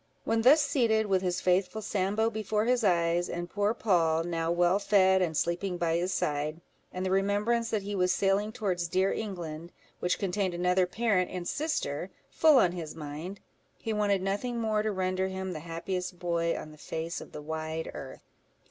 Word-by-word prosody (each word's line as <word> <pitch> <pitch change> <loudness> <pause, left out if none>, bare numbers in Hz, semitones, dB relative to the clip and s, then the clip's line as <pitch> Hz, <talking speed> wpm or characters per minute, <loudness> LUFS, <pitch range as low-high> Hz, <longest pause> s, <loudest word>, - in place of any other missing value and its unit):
When 225 0 +1
thus 280 +7 +7
seated, 230 -6 +2
with 190 -2 +2
his 180 -1 -1
faithful 185 +4 +1
Sambo 205 +3 0
before 215 0 -1
his 245 0 +2
eyes, 175 -2 +2
and 175 0 -4
poor 205 +2 0
Poll, 165 -7 +2
now 165 -1 -2
well 175 +3 +3
fed, 190 -2 +4
and 160 -4 0
sleeping 175 +2 -1
by 165 -1 +1
his 180 +2 -1
side, 150 -1 -1 0.3
and 185 +1 -4
the 185 - -1
remembrance 205 +4 +1
that 215 -3 -1
he 205 +1 -4
was 180 -2 +2
sailing 200 +3 +1
towards 190 -7 -1
dear 185 +3 +1
England, 170 -5 -5 0.3
which 180 - 0
contained 190 -1 -1
another 180 +1 +2
parent 200 -3 +1
and 180 -2 -5
sister, 190 - -2 0.2
full 310 -3 +5
on 185 -8 +5
his 165 -4 -6
mind, 155 +6 -7 0.4
he 225 - -3
wanted 205 -3 +1
nothing 220 +5 -2
more 215 -2 +1
to 215 0 -1
render 185 -1 0
him 190 0 -4
the 155 - -5
happiest 180 +3 -4
boy 170 -1 0
on 155 - -8
the 155 - -15
face 165 +2 -4
of - - -11
the 150 - -7
wide 160 +1 -4
earth. 135 -1 -9
185 Hz, 185 wpm, -29 LUFS, 170-210 Hz, 0.4 s, thus